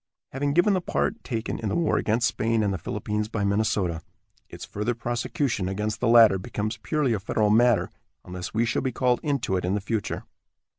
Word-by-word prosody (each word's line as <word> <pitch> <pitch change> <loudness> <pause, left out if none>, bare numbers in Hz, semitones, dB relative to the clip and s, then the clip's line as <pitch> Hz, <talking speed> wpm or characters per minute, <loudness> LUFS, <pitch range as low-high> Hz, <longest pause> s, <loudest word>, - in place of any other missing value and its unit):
Having 140 +1 -1
given 175 +6 +4
the 185 - +1
part 210 +5 -2
taken 115 -2 -3
in 110 - -2
the - - -1
war 170 -3 +1
against 115 +2 +1
Spain 115 0 0
and 100 -1 0
the 95 - -3
Philippines 105 +4 -3
by 110 -3 -2
Minnesota, 100 -4 0 0.5
its - - -8
further 105 +4 -2
prosecution 120 -3 -2
against 105 +2 -2
the 125 - 0
latter 115 -4 +7
becomes 110 +1 -4
purely 125 +4 0
a 105 - -1
federal 105 +1 +1
matter, 120 +1 +4 0.4
unless 90 0 -6
we 115 +1 +1
shall 115 - 0
be 130 - -1
called 125 0 +1
into 140 -10 -1
it 90 - -3
in 90 +3 0
the - - 0
future. 105 +1 -3
110 Hz, 200 wpm, -25 LUFS, 105-120 Hz, 0.5 s, latter